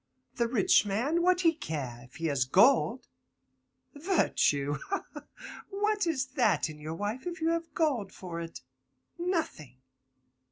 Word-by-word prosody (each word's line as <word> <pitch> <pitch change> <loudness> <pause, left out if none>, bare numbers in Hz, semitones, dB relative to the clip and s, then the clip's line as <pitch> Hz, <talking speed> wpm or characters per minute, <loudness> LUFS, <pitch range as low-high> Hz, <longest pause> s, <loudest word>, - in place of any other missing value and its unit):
The 235 - +2
rich 230 -6 +4
man, 240 +12 0
what 365 +1 +3
he 330 -2 +4
care, 135 - -5
if 125 - -20
he 165 - -5
has 140 -4 +2
gold? 235 - +4 0.9
Virtue! 150 - +1
ha, 395 - -2
ha! - - -9 0.4
what 415 -1 0
is 280 -6 0
that 240 -9 +2
in 150 - -12
your 155 +2 -5
wife 210 - -4
if 345 -1 -5
you 325 0 +1
have 335 0 -2
gold 270 - 0
for 175 -3 -7
it? 165 0 -8 0.6
Nothing. 320 - -2
240 Hz, 150 wpm, -30 LUFS, -, 0.9 s, rich